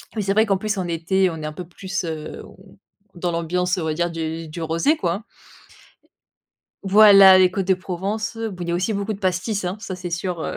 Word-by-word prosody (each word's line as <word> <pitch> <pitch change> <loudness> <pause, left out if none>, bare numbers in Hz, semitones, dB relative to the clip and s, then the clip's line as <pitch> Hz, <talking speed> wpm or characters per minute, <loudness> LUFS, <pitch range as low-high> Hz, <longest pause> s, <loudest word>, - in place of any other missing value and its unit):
Mais 215 - -1
c'est 195 0 0
vrai 220 +2 +4
qu'en 195 -2 +1
plus, 215 +1 -3
en 180 -2 -2
été, 180 +3 +1
on 165 - -6
est - - -5
un 155 - -5
peu 175 +1 -8
plus, 190 +1 -5
heu 155 -2 -6
on 190 0 -18 0.4
dans 175 0 -2
l'ambiance 180 +2 -1
on 175 - -2
va 155 - -1
dire 175 0 -1
du 165 0 -5
du 165 +2 -7
rosé, 165 - +1
quoi. 190 - -2 1.6
Voilà, 195 -1 +8
les 185 -1 +6
Côtes 195 -1 -3
de 190 - +5
Provence, 195 +5 -4
bon, 210 -6 -5
il 170 - -7
y - - 0
a - - 0
aussi 185 +5 -1
beaucoup 200 +2 -2
de 200 - -9
pastis, 190 +2 -1
hein, 180 +3 -3
ça, 200 -2 -6
c'est 180 -1 -7
sûr, 175 -1 -3
heu - - -4
185 Hz, 235 wpm, -22 LUFS, 170-200 Hz, 1.6 s, Voilà